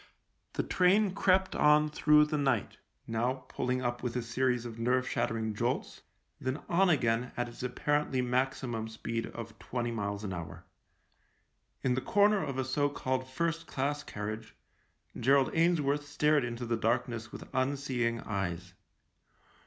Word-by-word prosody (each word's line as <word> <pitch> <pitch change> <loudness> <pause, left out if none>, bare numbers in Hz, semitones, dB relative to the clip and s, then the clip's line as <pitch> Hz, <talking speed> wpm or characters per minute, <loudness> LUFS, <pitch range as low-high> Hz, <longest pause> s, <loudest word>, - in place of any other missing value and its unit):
The - - 0
train 190 +2 +3
crept 190 -1 +2
on 150 0 +5
through 150 0 +5
the 150 0 -1
night 130 -7 0 0.2
— - - -46
now 125 +3 -1
pulling 130 0 -1
up 120 0 -2
with 125 -1 -3
a 125 - -1
series 125 +1 0
of 115 -1 -7
nerve 125 +2 +1
shattering 110 -1 -1
jolts, - - -2 0.4
then 130 +3 -2
on 185 +2 +3
again 125 -5 +2
at 120 0 0
its 120 - -10
apparently 135 +2 0
maxi 130 +1 0
mum 110 -2 -3
speed 115 +1 -4
of 115 -1 -9
twenty 120 -1 -3
miles 100 -2 -3
an 95 -3 -3
hour. 85 -2 -7 1.2
In 130 - +2
the 130 - 0
corner 205 +3 +3
of 135 - -4
a 130 - 0
so 145 +2 +1
called 130 -2 -2
first 165 +4 -2
class 145 +2 -1
carriage 110 +1 -6 0.6
Gerald 135 +2 +4
Ainsworth 150 -4 +2
stared 150 0 +2
into 120 0 -4
the 115 0 0
darkness 115 0 -1
with - - -9
unseeing 130 -3 0
eyes. 90 -3 -3
130 Hz, 155 wpm, -31 LUFS, 115-145 Hz, 1.2 s, on